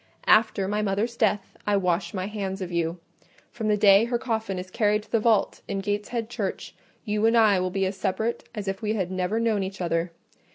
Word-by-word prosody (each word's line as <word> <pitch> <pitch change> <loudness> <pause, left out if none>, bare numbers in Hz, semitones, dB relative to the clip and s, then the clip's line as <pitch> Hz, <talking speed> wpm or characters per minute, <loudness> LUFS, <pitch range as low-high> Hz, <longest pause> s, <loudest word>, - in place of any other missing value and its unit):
After 215 -3 +4
my 210 +1 0
mother's 210 +3 -1
death, 210 -3 0
I 205 -1 +3
wash 175 -2 0
my 185 -2 -3
hands 195 -2 -4
of 185 -2 -5
you: 170 0 -1 0.5
from 225 -2 -4
the 210 -1 +3
day 200 +1 +6
her 240 0 0
coffin 220 -5 -2
is 185 +1 -7
carried 210 0 +1
to - - -23
the 230 - +3
vault 215 -2 +2
in 200 - -3
Gateshead 210 +3 -2
Church, 215 -5 -4 0.3
you 210 0 +1
and 230 +1 +4
I 210 -4 +5
will 185 0 0
be 195 +1 0
as 190 +1 -3
separate 220 +5 -2
as 205 -2 -5
if 195 0 -3
we 215 -1 0
had 190 -3 -2
never 185 +4 -1
known 225 -3 +1
each 190 0 -5
other. 170 0 -1
205 Hz, 215 wpm, -25 LUFS, 190-220 Hz, 0.5 s, day